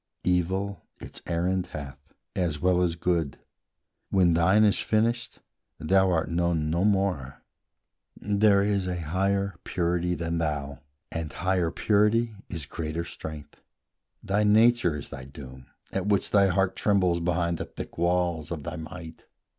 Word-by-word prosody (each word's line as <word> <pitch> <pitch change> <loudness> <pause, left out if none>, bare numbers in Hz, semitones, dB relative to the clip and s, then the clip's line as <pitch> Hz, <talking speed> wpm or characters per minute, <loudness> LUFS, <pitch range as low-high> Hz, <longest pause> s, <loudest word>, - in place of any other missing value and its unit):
Evil 95 +1 0 0.2
its - - -9
errand 90 +2 0
hath, 70 -2 -7 0.4
as 85 -5 -1
well 90 +1 +3
as 85 -2 +1
Good; 85 -4 -1 0.7
When 90 -3 +4
thine 95 +6 +4
is 105 0 +3
finished, 115 +1 0 0.4
thou 95 +3 +3
art 85 -3 +1
known 85 -2 0
no 85 +3 +1
more: 95 -10 0 0.8
There 100 -1 +3
is 100 -2 0
a 90 -1 -2
higher 95 +3 -1
purity 90 0 0
than 85 0 -2
thou, 75 -4 -2 0.3
And 80 -2 -4
higher 90 -2 0
purity 105 +5 +2 0.2
is 80 -5 -3
greater 80 +2 -4
strength; 75 -3 -9 0.6
Thy 105 +2 +1
nature 110 -5 +4
is 70 - -9
thy 70 -2 -7
doom, 65 -2 -11 0.2
at 95 0 -2
which 100 -2 +1
thy 100 -1 +5
heart 95 0 +1
Trembles 95 -4 +2
behind 85 -1 0
the - - -3
thick - - -9
wall 85 -2 +1
of 80 -4 -5
thy 80 - -5
might. 80 0 -9
90 Hz, 145 wpm, -27 LUFS, 80-100 Hz, 0.8 s, thy